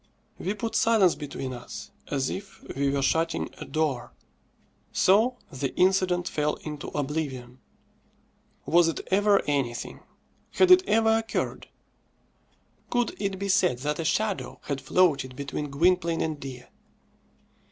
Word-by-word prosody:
We 195 Hz, +4 st, -2 dB
put 225 Hz, +2 st, -4 dB
silence 215 Hz, -6 st, +4 dB
between 135 Hz, -3 st, -6 dB
us, 120 Hz, 0 st, -9 dB, 0.2 s
as 135 Hz, -2 st, -1 dB
if 195 Hz, 0 st, -8 dB
we 140 Hz, +1 st, +1 dB
were 140 Hz, 0 st, 0 dB
shutting 165 Hz, +3 st, 0 dB
a -, -, -6 dB
door. 150 Hz, -6 st, -2 dB, 0.8 s
So 225 Hz, +7 st, +3 dB
the 135 Hz, 0 st, -3 dB
incident 185 Hz, -1 st, +2 dB
fell 150 Hz, -2 st, 0 dB
into 150 Hz, -2 st, -6 dB
oblivion. 135 Hz, -4 st, -3 dB, 1.1 s
Was 170 Hz, 0 st, +4 dB
it 165 Hz, -, -2 dB
ever 200 Hz, +1 st, +4 dB
anything? 135 Hz, -5 st, -2 dB, 0.5 s
Had 370 Hz, -1 st, +4 dB
it 365 Hz, 0 st, +8 dB
ever 225 Hz, 0 st, +4 dB
occurred? 225 Hz, -1 st, -3 dB, 1.2 s
Could 245 Hz, -1 st, 0 dB
it 195 Hz, -1 st, -1 dB
be 200 Hz, +1 st, -3 dB
said 185 Hz, -8 st, +3 dB
that 150 Hz, +1 st, -1 dB
a -, -, -1 dB
shadow 205 Hz, +4 st, -1 dB
had 140 Hz, -1 st, -3 dB
floated 145 Hz, -8 st, +2 dB
between 140 Hz, +2 st, -4 dB
Gwynplaine 170 Hz, +3 st, +2 dB
and 155 Hz, -2 st, -2 dB
Dea? 130 Hz, -3 st, -8 dB
165 Hz, 130 wpm, -27 LUFS, 140-195 Hz, 1.2 s, it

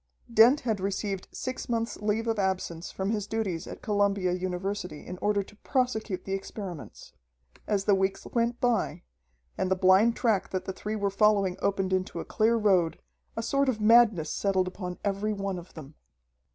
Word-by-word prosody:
Dent 235 Hz, +6 st, +6 dB
had 220 Hz, -4 st, -1 dB
received 195 Hz, 0 st, -3 dB
six 255 Hz, 0 st, -5 dB
months' 230 Hz, -1 st, -1 dB
leave 210 Hz, +2 st, -1 dB
of 225 Hz, -2 st, 0 dB
absence 185 Hz, -3 st, -2 dB
from 195 Hz, +2 st, -2 dB
his 210 Hz, -2 st, -2 dB
duties 205 Hz, -7 st, -2 dB
at -, -, -9 dB
Columbia 200 Hz, -3 st, +1 dB
University 180 Hz, -2 st, -3 dB
in 180 Hz, -, -7 dB
order 205 Hz, -1 st, +1 dB
to 200 Hz, -, -17 dB
prosecute 225 Hz, -6 st, -1 dB
the 195 Hz, -, -3 dB
experiments. 195 Hz, -4 st, -7 dB, 0.5 s
As 205 Hz, -2 st, +1 dB
the 205 Hz, -, +4 dB
weeks 195 Hz, 0 st, 0 dB
went 235 Hz, 0 st, -1 dB
by, 220 Hz, -9 st, 0 dB, 0.6 s
and 190 Hz, -, 0 dB
the 190 Hz, -, +3 dB
blind 190 Hz, +5 st, +5 dB
track 215 Hz, -5 st, +1 dB
that 185 Hz, -, -3 dB
the 190 Hz, -, -4 dB
three 210 Hz, +3 st, -4 dB
were 200 Hz, -2 st, -1 dB
following 200 Hz, -2 st, +3 dB
opened 195 Hz, -1 st, 0 dB
into 185 Hz, -2 st, -1 dB
a -, -, -5 dB
clear 225 Hz, +2 st, +2 dB
road, 190 Hz, -7 st, +2 dB, 0.4 s
a 225 Hz, -, -1 dB
sort 275 Hz, +3 st, +1 dB
of 230 Hz, -4 st, -1 dB
madness 215 Hz, -7 st, +5 dB
settled 190 Hz, -2 st, +1 dB
upon 180 Hz, -1 st, -5 dB
every 200 Hz, +2 st, 0 dB
one 195 Hz, -2 st, -3 dB
of 175 Hz, -, -14 dB
them. 155 Hz, -2 st, -10 dB
200 Hz, 180 wpm, -28 LUFS, 185-220 Hz, 0.6 s, Dent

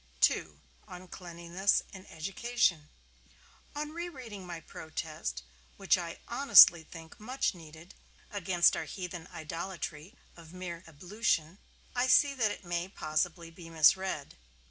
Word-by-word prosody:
II. 75 Hz, -2 st, -5 dB, 0.3 s
ON 185 Hz, -1 st, -10 dB
CLEANLINESS 175 Hz, +2 st, -1 dB
IN 190 Hz, 0 st, -11 dB
EDUCATION 185 Hz, -2 st, -1 dB, 0.9 s
On 300 Hz, +1 st, -4 dB
re 340 Hz, +2 st, -5 dB
reading 225 Hz, -, -9 dB
my 170 Hz, -1 st, -6 dB
protest, 155 Hz, -, -6 dB, 0.3 s
which -, -, +3 dB
I -, -, -5 dB
honestly 170 Hz, -1 st, +8 dB
think 160 Hz, 0 st, -12 dB
much 250 Hz, +4 st, -1 dB
needed, 160 Hz, 0 st, -13 dB, 0.4 s
against 185 Hz, -3 st, +3 dB
our -, -, -3 dB
heathen 175 Hz, +1 st, -7 dB
idolatry 165 Hz, -, -6 dB, 0.2 s
of 165 Hz, 0 st, -14 dB
mere 175 Hz, -2 st, -6 dB
ablution, 175 Hz, +1 st, -1 dB, 0.3 s
I 250 Hz, +1 st, +1 dB
see 280 Hz, +2 st, +5 dB
that 235 Hz, -6 st, +1 dB
it 205 Hz, -, -7 dB
may 175 Hz, +1 st, -2 dB
possibly 165 Hz, 0 st, -2 dB
be 165 Hz, 0 st, -12 dB
misread. 165 Hz, -1 st, +2 dB
175 Hz, 125 wpm, -31 LUFS, 160-200 Hz, 0.9 s, honestly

